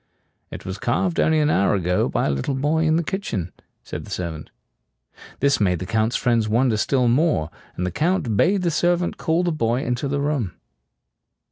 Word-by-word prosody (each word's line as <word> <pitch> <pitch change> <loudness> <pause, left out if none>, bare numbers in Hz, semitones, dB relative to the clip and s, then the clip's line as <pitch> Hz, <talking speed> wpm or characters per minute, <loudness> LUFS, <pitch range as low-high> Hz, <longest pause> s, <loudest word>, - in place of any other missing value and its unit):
"It - - -9
was 95 +2 -5
carved 170 +10 0
only 160 0 +3
an 150 0 +2
hour 100 +2 +2
ago 90 -1 +1
by - - 0
a - - +1
little 70 - -2
boy 150 +4 +1
in 155 0 +3
the 170 - +1
kitchen," 115 - -3 0.3
said - - -6
the - - -12
servant. 80 -4 -5 0.9
This 140 +1 +3
made 90 -4 +2
the 95 - -5
Count's 110 +3 0
friends 115 -3 +1
wonder 115 0 +2
still 125 +3 +1
more; 125 - +2 0.3
and 90 - -1
the 90 - -2
Count 155 - 0
bade 185 - +2
the 170 - +1
servant 175 +2 +1
call 165 +2 +1
the 175 - +1
boy 120 -4 0
into 125 +3 -2
the 140 +1 -1
room. 140 - -1
125 Hz, 195 wpm, -22 LUFS, 105-160 Hz, 0.9 s, only